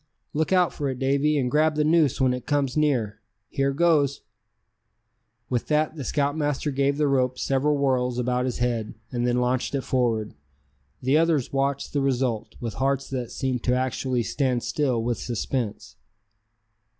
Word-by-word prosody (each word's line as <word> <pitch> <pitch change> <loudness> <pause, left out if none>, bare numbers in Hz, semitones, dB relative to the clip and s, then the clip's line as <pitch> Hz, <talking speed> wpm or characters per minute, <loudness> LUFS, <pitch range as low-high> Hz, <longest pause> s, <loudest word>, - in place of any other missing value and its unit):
"Look 160 +3 0
out 180 -2 +3
for 145 -3 -2
it, 130 - -3
Davy, 140 +3 +2
and 125 -3 0
grab 155 +1 +3
the 150 - +2
noose 155 -3 +3
when 130 -1 +3
it 125 -1 -6
comes 140 -3 0
near! 125 -9 +1 0.3
Here 135 -1 0
goes!" 145 -2 +2 1.3
With 120 -1 -2
that 155 +1 +1
the 145 - -5
scoutmaster 145 +2 -1
gave 140 +1 +1
the 150 -1 +2
rope 130 -2 +1
several 140 +2 +1
whirls 125 -3 +1
about 125 0 0
his 125 - -2
head, 120 -3 -1 0.2
and 120 -1 -1
then 120 0 +1
launched 125 +2 0
it 135 - 0
forward. 115 -5 0 0.7
The 135 +4 +4
others 160 -6 +1
watched 140 0 -1
the 145 - +1
result, 130 -4 -1
with 115 -2 -4
hearts 135 0 0
that 125 -3 -3
seemed 130 -3 -2
to 125 - +3
actually 130 -1 -1
stand 125 -2 0
still 130 -6 0
with 120 0 -1
suspense. 120 -1 -3
135 Hz, 165 wpm, -25 LUFS, 125-145 Hz, 1.3 s, The